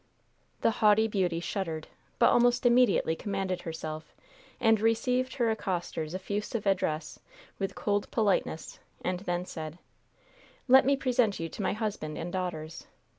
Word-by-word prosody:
The - - +4
haughty 215 +1 +5
beauty 185 -5 0
shuddered, 170 -3 -3 0.3
but - - +5
almost 245 +1 +3
immediately 240 -9 +4
commanded 195 -1 -3
herself 155 -1 -6 0.4
and 225 -3 +4
received 250 +3 +1
her 230 -4 +1
accoster's 175 -4 -3
effusive 205 +3 -3
address 185 -5 0 0.4
with 195 -1 -2
cold 205 -1 -1
politeness, 200 -7 0 0.3
and 180 0 0
then 175 -2 -2
said: 160 -2 -7 0.9
"Let 265 +1 +7
me 280 0 +4
present 245 -6 +1
you 165 0 -3
to 205 - -7
my - - 0
husband 205 -8 -3
and 170 +1 -5
daughters. 165 -4 -4
195 Hz, 135 wpm, -29 LUFS, 170-225 Hz, 0.9 s, Let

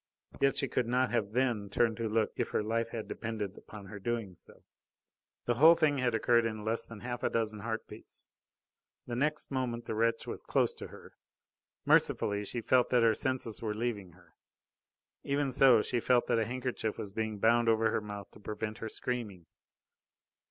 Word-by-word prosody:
Yet 140 0 +2
she 135 - 0
could 125 -1 -1
not 125 +1 +1
have 105 -4 0
then 120 -5 0
turned 110 +2 +2
to 115 -1 -2
look 110 0 +1
if - - -2
her - - 0
life 115 +1 -1
had 115 -2 -5
depended 110 -4 -4
upon 105 -2 -11
her 100 +1 -9
doing 115 -2 -3
so. - - -13 0.8
The 120 - +2
whole 160 +7 +7
thing 155 -4 +2
had 120 -2 +1
occurred 115 +1 +3
in 110 -2 -3
less 115 +1 -2
than 115 -3 -10
half 120 0 -4
a - - +1
dozen 110 -2 -1
heart 110 +1 -4
beats. - - -11 0.8
The 120 - -4
next 150 +4 -1
moment 120 -3 -2
the - - -3
wretch 115 +1 +1
was - - -4
close - - +1
to - - -8
her. - - -14 0.7
Mercifully 105 0 +3
she 120 - -4
felt 125 +2 +3
that 125 -2 +3
her 115 -1 +5
senses 125 -2 -2
were 110 -2 -2
leaving 105 -6 -3
her. 85 -2 -22 0.9
Even 140 -1 0
so, 125 -4 +6
she 120 - -1
felt 120 +1 +3
that 115 - +1
a 110 - +1
handkerchief 125 -3 -3
was 100 - -5
being 110 0 -3
bound 115 +2 +3
over 115 0 +3
her - - 0
mouth 105 -2 -8
to - - -15
prevent 110 +1 -5
her 115 - -4
screaming. 110 -8 -4
115 Hz, 195 wpm, -31 LUFS, 105-125 Hz, 0.9 s, whole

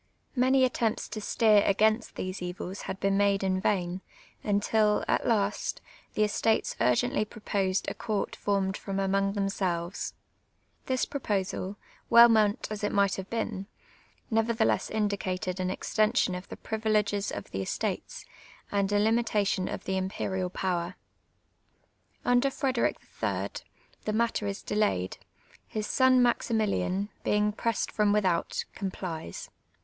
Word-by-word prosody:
Many 260 +1 +4
attempts 230 -3 -1
to 215 0 -5
steer 215 0 +4
against 215 +3 +2
these 185 0 -4
evils 180 +2 -5
had 190 - -4
been 195 0 +2
made 200 -1 +3
in 185 -1 +1
vain, 185 -2 0 0.4
imtil, 210 +1 +2
at - - +1
last, 210 -3 0 0.4
the 215 - +3
estates 220 +1 +1
urgently 125 - +2
proposed 200 -3 -1
a - - -1
court 215 -4 -2
formed 195 -1 0
from 195 -1 -4
among 195 0 +1
themselves. 190 -3 -2 0.7
This 260 -1 +1
proposal, 200 -6 -2 0.3
well 235 0 +9
meant 215 -2 +3
as 215 -1 -5
it 205 - +1
might 200 -1 +3
have 190 0 -6
been, 215 -4 -3 0.6
nevertheless 225 0 +2
indicated 190 -3 -1
an 185 0 0
extension 215 0 +1
of 180 +1 -6
the - - -7
privileges 210 -2 0
of 100 - -7
the 95 - -2
estates, 95 - -3 0.5
and 200 -1 +1
a 205 - +3
limitation 210 -3 +2
of - - -5
the 190 0 -1
imperial 190 -1 -2
power. 180 -1 -2 1.3
I'nder 245 +2 +4
Frederic 265 -2 0 0.3
III. - - 0 0.6
the 215 - -1
matter 225 -2 0
is 200 0 -4
delayed; 205 - 0 0.5
his 215 -1 -3
son 255 +2 +4
Mnximili; 225 -3 +1
in, 195 +3 -1
being 210 0 +2
pressed 230 +2 -1
from 210 -1 +2
without, 190 -5 +1
complies. 180 - -5
205 Hz, 135 wpm, -29 LUFS, 190-220 Hz, 1.3 s, well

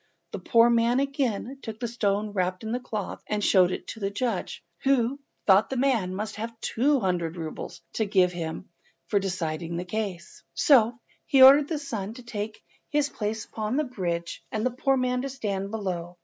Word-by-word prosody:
The - - -5
poor 230 -1 +5
man 235 +2 +3
again 270 -2 -1
took 220 -1 -7
the 240 - -2
stone 210 -2 0
wrapped 185 0 -1
in 220 - -4
the 245 - 0
cloth 215 -5 -5
and 210 -1 -1
showed 185 -3 +5
it - - -4
to - - -7
the 195 -2 -1
judge, 205 -4 -3 0.2
who 270 0 +2 0.3
thought 195 +1 +5
the 265 - -2
man 235 -9 +1
must 215 +1 -4
there 225 +2 -2
have 230 -1 -20
two 275 +6 +2
hundred 175 -4 -1
roubles 160 -2 -6
to 220 - 0
give 185 -3 +3
to - - -11
him 165 +1 -5 0.4
for 205 - +3
deciding 170 -3 -3
the 180 - -3
case. 195 -3 -5
So 240 -5 +5 0.3
he 270 -1 +6
ordered 280 +2 +9
the 320 - -2
son 225 -7 -5
to 250 - -10
take 215 -2 -5 0.3
his 295 -1 +1
place 215 0 -3
upon 220 +4 -3
the 305 - +2
bridge 175 - -4
and 215 +1 -1
the 255 - +2
poor 270 +2 +1
man 250 0 0
to 275 - -3
stand 200 -7 -3
below. 180 -5 -4
220 Hz, 200 wpm, -26 LUFS, 190-250 Hz, 0.4 s, ordered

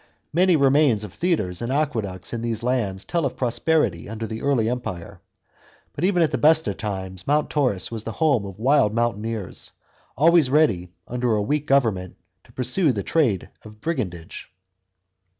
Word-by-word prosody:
Many 180 +2 +4
remains 140 -6 +3
of 100 -3 -8
theatres 130 - -1
and 120 +2 -2
aqueducts 110 - -2
in 115 - -3
these 115 -1 -3
lands 110 -7 -1
tell 170 -1 -1
of 135 - -2
prosperity 120 - 0
under 110 +1 -5
the 110 0 -6
early 135 -6 +1
Empire; 100 -6 -5 0.7
but 145 - -5
even 180 -2 +3
at 160 - +1
the - - -1
best 160 +1 +5
times 95 -3 -5
Mount 150 +1 +1
Taurus 125 - 0
was 110 -2 -5
the 115 - -5
home 145 -9 +2
of 95 -2 -8
wild 125 -2 +3
mountaineers, 115 -3 -3 0.4
always 165 0 +5
ready, 120 - +2 0.2
under 125 -2 0
a 105 - +1
weak 150 +6 -1
government, 110 -10 +1 0.3
to - - -20
pursue 130 +6 +1
the 100 -5 -3
trade 125 - 0
of 105 -1 -13
brigandage. 95 - -5
120 Hz, 165 wpm, -23 LUFS, 105-150 Hz, 0.7 s, best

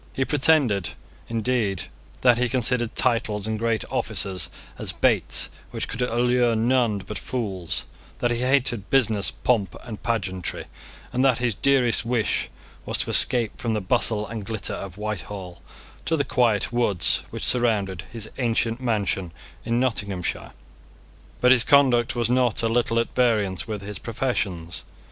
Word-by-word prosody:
He 130 - +1
pretended, 135 - +3 0.4
indeed, 115 -5 0 0.4
that 120 -2 +5
he 125 -1 +1
considered 125 -2 +1
titles 110 -4 +1
and 110 -1 -2
great 115 -1 0
offices 90 -4 0 0.3
as - - -1
baits - - +2 0.2
which - - -4
could 115 - -5
allure 120 0 +2
none 115 -1 +2
but 105 - -5
fools, 100 -9 -2 0.3
that 120 - 0
he 120 - -1
hated 125 -5 +1
business, 110 -7 +2
pomp, 110 -6 0
and 110 -3 -8
pageantry, 95 -6 -2 0.5
and 125 - +1
that 130 -3 +4
his 120 -2 0
dearest 125 0 +2
wish 115 -2 0 0.3
was - - -2
to - - -2
escape 120 0 +3
from 115 -3 -1
the - - 0
bustle 105 +1 +1
and 110 0 -6
glitter 110 -2 -3
of 95 -1 -7
Whitehall 100 -4 -6 0.4
to 165 - +1
the 140 - 0
quiet 120 -4 +1
woods 110 -7 +2
which - - -4
surrounded 100 -7 +1
his 110 -2 -6
ancient 115 0 0
mansion 100 -7 -1 0.3
in 115 0 0
Nottinghamshire; 105 -8 -2 0.9
but 125 - +5
his 125 -2 +6
conduct 130 -5 +4
was 120 -2 +1
not 125 -2 +2
a - - +3
little 115 0 +1
at 115 - 0
variance 105 -8 +1
with 105 -3 -5
his 100 0 -6
professions. 95 -9 -2
115 Hz, 150 wpm, -24 LUFS, 105-125 Hz, 0.9 s, his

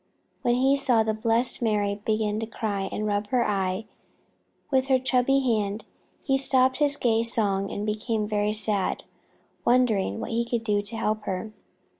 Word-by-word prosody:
But 240 -2 +2
when - - +2
he 270 +1 +4
saw 250 -5 +3
the 220 0 0
blessed 230 +3 0
Mary 205 -2 0
begin 215 -1 0
to 225 - -4
cry 205 -3 -3
and 215 - -3
rub 205 0 -1
her 250 0 +1
eye 190 0 -1 0.9
with 265 -1 +2
her 265 -1 +4
chubby 260 +1 +2
hand, 215 -4 -1 0.4
he 270 -1 +2
stopped 260 0 +3
his 290 -1 +3
gay 225 -2 +2
song 200 -4 0
and 205 - -4
became 215 0 -2
very 210 0 0
sad, 210 -2 -1 0.6
wondering 225 - +2
what - - -5
he 230 +1 +1
could 235 -1 -2
do 205 -2 +1
to 205 +3 -7
help 215 -1 -1
her. 190 +3 -4
220 Hz, 175 wpm, -26 LUFS, 210-245 Hz, 0.9 s, he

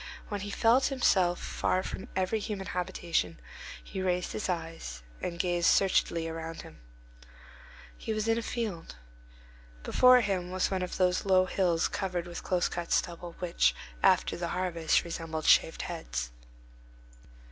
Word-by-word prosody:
When 205 -2 -3
he 205 - -5
felt 230 +5 +3
himself 190 -10 +2
far 185 - -1
from - - -6
every 190 +4 0
human 205 -2 -4
habitation, 175 - -2 0.4
he 190 - -5
raised 180 -1 0
his 210 - -3
eyes 165 - -4 0.2
and 170 - -3
gazed 175 0 +1
searchingly 170 -3 +3
about 165 0 -6
him. - - -13 1.2
He - - -5
was 215 0 -1
in 225 - +3
a 230 - -1
field. 215 - -4 0.9
Before 250 0 +6
him 190 -4 -1
was 185 +1 0
one 190 -1 0
of 180 - -4
those 180 -1 +2
low 185 -1 +4
hills 180 -3 +1
covered 180 -3 -3
with 175 -1 -7
close 180 -1 +1
cut 175 -1 -5
stubble, 170 0 -1
which, 180 -2 +2 0.3
after - - +3
the 170 0 -3
harvest, 170 -3 +1
resemble 165 -2 -5
shaved - - +4
heads. - - -4
180 Hz, 145 wpm, -30 LUFS, 170-195 Hz, 1.2 s, Before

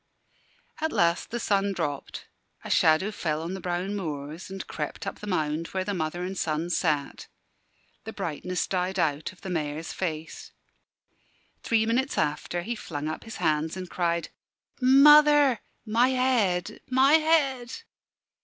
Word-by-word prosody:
At 320 +1 -1
last 170 0 +1
the 240 - -3
sun 200 -2 +1
dropped; 150 -6 -4 0.4
a - - -6
shadow 160 +6 +4
fell 160 -6 -2
on 170 +3 -4
the 190 - -6
brown 180 +3 -2
moors 155 -2 -5
and 190 0 -6
crept 150 +4 -5
up 195 - -5
the 210 - -8
mound 160 -3 -1
where 190 -1 -2
the 205 +2 -3
mother 175 0 -3
and 190 +2 -4
son 165 0 -2
sat. 150 -6 -1 0.8
The 220 - -5
brightness 180 -2 -3
died 185 0 -2
out 150 -3 0
of 185 - -20
the 190 - -6
Mayor's 155 -1 -3
face. 160 -3 -5 1.1
Three 225 -1 +2
minutes 255 +4 0
after, 155 +3 -1
he 235 - -3
flung 150 -8 -5
up 155 - -5
his 225 - -8
hands 155 +2 0
and 185 -1 -7
cried, 170 -1 -1 0.5
"Mother 290 0 +7 0.3
my 230 +3 +3
head, 245 -9 +1
my 265 +3 +4
head!" 290 -6 +3
185 Hz, 150 wpm, -27 LUFS, 160-230 Hz, 1.1 s, Mother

